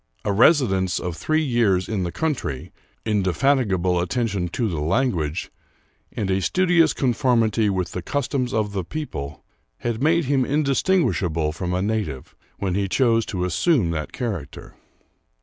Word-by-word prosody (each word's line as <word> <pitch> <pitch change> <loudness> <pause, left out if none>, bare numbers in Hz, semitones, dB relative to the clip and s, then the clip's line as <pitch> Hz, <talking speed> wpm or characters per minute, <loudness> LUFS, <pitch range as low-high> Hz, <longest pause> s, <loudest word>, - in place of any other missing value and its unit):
A 100 - +1
residence 95 - +3
of 90 -2 -4
three 155 - 0
years 115 -9 +2
in 105 -4 -2
the 90 -1 -2
country, 90 - -3 0.3
indefatigable 95 - +1
at 90 - -3
tention 100 -7 -1
to 110 +7 -2
the 85 -7 -3
language, 85 - -1 0.6
and 100 -3 -2
a 95 +1 +1
studious 175 - +3
conformity 120 -5 +1
with 95 -3 -2
the 90 - -4
customs 130 - -2
of 105 -2 0
the 95 -2 -2
people, 80 - -6 0.4
had 120 0 -2
made 165 +2 +3
him 135 0 +2
indistinguishable 135 - +1
from 90 +3 -4
a 90 - 0
native 100 - -3 0.2
when 95 -3 -2
he 100 +1 0
chose 115 -1 +2
to 90 -2 -2
assume 95 - +2
that 75 -2 -4
character. 100 - -5
105 Hz, 150 wpm, -23 LUFS, 90-130 Hz, 0.6 s, residence